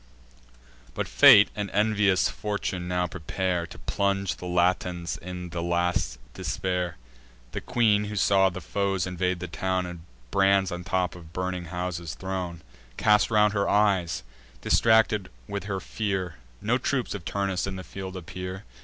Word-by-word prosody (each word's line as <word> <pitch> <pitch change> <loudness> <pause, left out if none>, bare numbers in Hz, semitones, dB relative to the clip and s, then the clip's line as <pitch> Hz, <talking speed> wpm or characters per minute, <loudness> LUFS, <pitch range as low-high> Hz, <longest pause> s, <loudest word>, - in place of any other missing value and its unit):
But - - -2
fate 100 - +8
and 105 -1 -3
envious 105 -2 +3
fortune 100 -4 -3
now 90 0 0
prepare 90 +2 -2
To - - -12
plunge 100 -1 -1
the 90 - -7
Latins 90 -1 0
in 90 0 -7
the 85 0 -3
last 85 -7 0 0.2
despair. 90 -2 -2 0.5
The - - -4
queen, 105 -3 +2
who 105 0 -5
saw 95 -1 +4
the 90 +1 -7
foes 95 +1 -1
invade 90 0 -1
the 90 - -5
town, 95 +2 -1
And 90 -1 -7 0.3
brands 95 -1 +3
on 90 0 -5
tops 90 -2 -1
of 85 -2 -13
burning 90 -1 -3
houses 85 -3 -4
thrown, 90 +2 -4 0.3
Cast 105 -1 +4
round 105 -2 +4
her 100 -2 +1
eyes, 95 -8 +2 0.4
distracted 110 -3 +3 0.2
with 100 -1 -4
her 100 -2 -2
fear— 95 -5 -2 0.3
No 120 +4 +2
troops 130 -1 -1
of 100 -5 -6
Turnus 100 0 -1
in 95 - -4
the 95 - -6
field 95 -1 -7
appear. 90 +2 -6
95 Hz, 155 wpm, -26 LUFS, 90-100 Hz, 0.5 s, fate